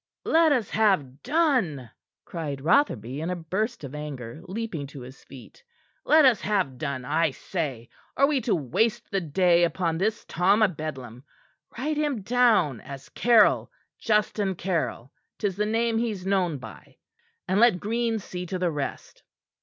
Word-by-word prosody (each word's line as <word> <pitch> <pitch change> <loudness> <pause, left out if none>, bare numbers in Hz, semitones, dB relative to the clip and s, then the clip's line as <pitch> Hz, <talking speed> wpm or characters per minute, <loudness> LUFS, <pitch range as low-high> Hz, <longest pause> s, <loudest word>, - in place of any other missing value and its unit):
"Let 325 -1 +4
us 245 -7 0
have 170 -12 +1
done," 250 - 0 0.3
cried 150 -5 -5
Rotherby 140 - +1
in 165 - -3
a 180 - -1
burst 190 +6 -3
of 135 -1 -7
anger, 145 -4 -7
leaping 185 -7 -4
to 140 -1 -10
his 130 +2 -12
feet. 135 - -14 0.4
"Let 310 -1 +6
us 245 -6 +4
have 190 -11 -1
done, 140 -4 -4
I 155 +4 +2
say! 135 -4 -5 0.3
Are 275 - +5
we 280 -2 +1
to 230 -1 +1
waste 175 - -1
the 195 - 0
day 175 +2 +3
upon 170 -1 0
this 215 +4 -1
Tom 195 +5 +2
o' - - +6
Bedlam? 135 - -7 0.5
Write 295 +5 -2
him 290 -8 -1
down 220 - +3
as 135 -1 -10
Caryll 230 -3 +4 0.3
Justin 210 -3 0
Caryll 155 -9 -3 0.3
'tis 200 -4 -2
the 210 +1 -1
name 225 +1 +1
he's 215 -6 -3
known 185 -5 +1
by; 115 -4 -13 0.5
and 190 +3 +1
let 230 -6 +5
Green 230 +2 -1
see 180 -3 -7
to 185 - -3
the 180 -2 0
rest." 145 -3 -6
185 Hz, 160 wpm, -26 LUFS, 145-225 Hz, 0.5 s, Let